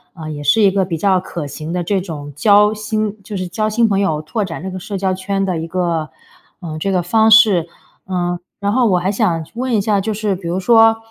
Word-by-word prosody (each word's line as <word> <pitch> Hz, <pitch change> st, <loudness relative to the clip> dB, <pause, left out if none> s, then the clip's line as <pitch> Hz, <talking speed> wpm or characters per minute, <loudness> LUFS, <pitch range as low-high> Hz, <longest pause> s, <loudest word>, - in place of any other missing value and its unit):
呃， 155 Hz, -3 st, -7 dB
也 145 Hz, -1 st, -6 dB
是 150 Hz, +10 st, +3 dB
一 195 Hz, -, +5 dB
个 195 Hz, 0 st, +1 dB
比 175 Hz, -3 st, -3 dB
较 190 Hz, +2 st, +2 dB
可 170 Hz, -3 st, -6 dB
行 155 Hz, +3 st, -7 dB
的 180 Hz, 0 st, -2 dB
这 190 Hz, +2 st, 0 dB
种 150 Hz, -5 st, -7 dB
交 210 Hz, +5 st, +4 dB
新 215 Hz, 0 st, -2 dB
就 205 Hz, +1 st, -6 dB
是 185 Hz, -1 st, -3 dB
交 215 Hz, +5 st, -1 dB
新 230 Hz, +2 st, +2 dB
朋 200 Hz, -2 st, +1 dB
友、 160 Hz, -7 st, 0 dB
拓 210 Hz, +8 st, -2 dB
展 165 Hz, -3 st, -6 dB
这 190 Hz, -, -5 dB
个 185 Hz, -, -6 dB
社 200 Hz, +2 st, -5 dB
交 190 Hz, 0 st, 0 dB
圈 195 Hz, +1 st, -2 dB
的 180 Hz, -4 st, -2 dB
一 165 Hz, -, -5 dB
个， 170 Hz, -3 st, -2 dB, 0.5 s
呃， 165 Hz, -3 st, -6 dB
这 195 Hz, +5 st, -1 dB
个 180 Hz, -2 st, +1 dB
方 220 Hz, +5 st, +3 dB
式。 215 Hz, -7 st, +6 dB, 0.4 s
嗯， 175 Hz, -1 st, -2 dB, 0.2 s
然 200 Hz, 0 st, -1 dB
后 250 Hz, 0 st, +3 dB
我 185 Hz, -4 st, +3 dB
还 180 Hz, +2 st, 0 dB
想 190 Hz, -6 st, 0 dB
去 -, -, -18 dB
问 255 Hz, +2 st, -2 dB
一 -, -, +3 dB
下， 200 Hz, 0 st, +1 dB
就 220 Hz, +3 st, -2 dB
是 210 Hz, -1 st, -1 dB
比 180 Hz, -2 st, -8 dB
如 175 Hz, +2 st, -1 dB
说， 225 Hz, +2 st, +5 dB
190 Hz, 270 characters per minute, -17 LUFS, 175-210 Hz, 0.5 s, 式